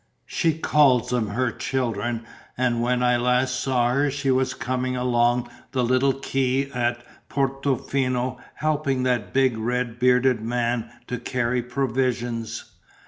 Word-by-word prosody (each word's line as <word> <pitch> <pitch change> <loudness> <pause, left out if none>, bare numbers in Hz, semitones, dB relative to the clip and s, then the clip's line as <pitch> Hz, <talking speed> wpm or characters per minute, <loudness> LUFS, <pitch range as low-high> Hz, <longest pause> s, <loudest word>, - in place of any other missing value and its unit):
"She 160 -3 0
calls 140 -6 +3
them 120 -3 +1
her 120 +4 0
children 120 -2 -2 0.3
and 120 -2 +1
when 125 +1 +1
I 125 0 +4
last 125 +1 +1
saw 125 -2 +1
her 140 +2 +2
she 140 -1 0
was 130 0 +1
coming 125 0 -2
along 120 -1 +2 0.3
the 130 -2 +1
little 130 +3 +3
quay 135 0 -1
at 120 -1 -1 0.3
Portofino 135 -2 -1 0.2
helping 145 -4 0
that 125 -4 0
big 130 -4 +2
red 120 +1 -2
bearded 125 -1 +3
man 120 0 -1 0.2
to 125 - -4
carry 125 -1 -1
provisions. 125 -2 -2
125 Hz, 135 wpm, -24 LUFS, 120-130 Hz, 0.3 s, I